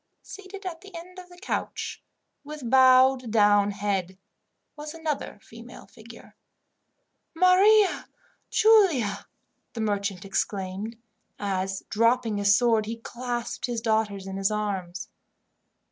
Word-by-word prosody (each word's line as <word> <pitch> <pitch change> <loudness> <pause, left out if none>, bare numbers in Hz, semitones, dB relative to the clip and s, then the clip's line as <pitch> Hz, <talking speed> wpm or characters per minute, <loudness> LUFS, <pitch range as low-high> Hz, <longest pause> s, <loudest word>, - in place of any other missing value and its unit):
Seated 395 0 -11
at 335 -3 -6
the 395 -2 -14
end 365 +2 -10
of 360 -1 -13
the 355 - -15
couch, 400 - -4 0.4
with 295 -3 -8
bowed 260 0 +5
down 205 -2 +4
head, 195 -3 -3 0.6
was 300 +1 -8
another 315 -8 -4
female 230 +2 -13
figure. 230 0 -15 1.0
"Maria 380 +4 +4 0.4
Giulia!" 320 - +3 0.5
the 230 - -5
merchant 200 -3 -2
exclaimed, 195 +2 -3 0.4
as, 195 -1 -3
dropping 230 -1 +2
his 200 0 +4
sword, 225 -2 +2
he 225 +1 -4
clasped 240 +1 -5
his 240 -2 -2
daughters 220 -4 -1
in 195 0 -6
his 195 0 +1
arms. 195 -4 -4
230 Hz, 115 wpm, -26 LUFS, 200-305 Hz, 1.0 s, bowed